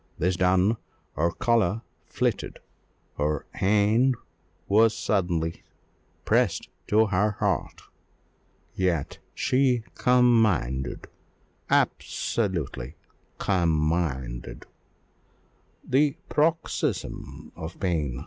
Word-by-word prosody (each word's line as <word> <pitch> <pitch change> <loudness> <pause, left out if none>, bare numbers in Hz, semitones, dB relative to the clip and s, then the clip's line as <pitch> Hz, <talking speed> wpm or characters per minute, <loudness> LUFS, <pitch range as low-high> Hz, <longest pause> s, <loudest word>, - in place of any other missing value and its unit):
This 90 +2 +1
done, 95 +4 +3 0.4
her 85 +3 +2
colour 115 -1 +1 0.2
flitted - - -2 0.6
her 75 0 0
hand 105 +6 +3 0.5
was 110 +2 +4
suddenly 85 -7 -1 0.6
pressed - - +1 0.2
to 110 +1 +4
her 105 +1 +1
heart; - - -1 0.9
yet 90 -6 -1 0.2
she 125 -3 +2
commanded 110 - +2 0.6
absolutely 85 - -1 0.4
commanded, 75 -9 -1 1.2
the 140 +2 +2
paroxysm 160 +2 -1
of 80 +1 -8
pain. 75 -9 -1
95 Hz, 70 wpm, -26 LUFS, 80-115 Hz, 1.2 s, was